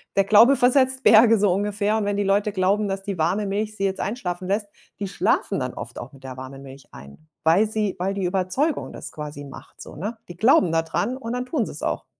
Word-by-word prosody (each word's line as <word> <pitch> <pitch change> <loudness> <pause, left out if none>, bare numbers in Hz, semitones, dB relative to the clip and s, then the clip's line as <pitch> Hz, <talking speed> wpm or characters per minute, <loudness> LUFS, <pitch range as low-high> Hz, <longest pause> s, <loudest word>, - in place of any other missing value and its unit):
der 195 - +3
Glaube 225 +7 +6
versetzt 260 +1 +3
Berge 225 0 +6
so 200 -2 +3
ungefähr 205 +2 0
und 215 - -1
wenn 205 0 -1
die 205 - +1
Leute 200 +2 +1
glauben, 200 +2 +1
dass 195 0 -3
die 195 -1 -5
warme 190 +6 0
Milch 210 +2 -3
sie 195 - -4
jetzt 190 0 -2
einschlafen 185 -5 -4
lässt, 205 +2 -1 0.3
die 200 - -3
schlafen 195 +1 0
dann 130 -2 -4
oft 120 - -8
auch 125 +3 -9
mit 135 -1 -17
der 130 -1 -8
warme 130 +1 -9
Milch 135 0 -13
ein, 70 0 -13 0.3
weil 170 +7 +4
sie 210 -2 -2
weil 190 +2 -2
die 195 -2 -3
Überzeugung 190 - -1
das - - -7
quasi 150 -1 -7
macht 140 -1 -13
so, - - -11
ne? 210 +9 -5
Die 175 - -10
glauben 210 -5 +4
da 165 0 +1
dran 180 +10 -2
und 230 -3 -6
dann 250 0 -3
tun 255 -4 -1
sie's - - -6
auch. - - -3
200 Hz, 235 wpm, -23 LUFS, 175-215 Hz, 0.3 s, Glaube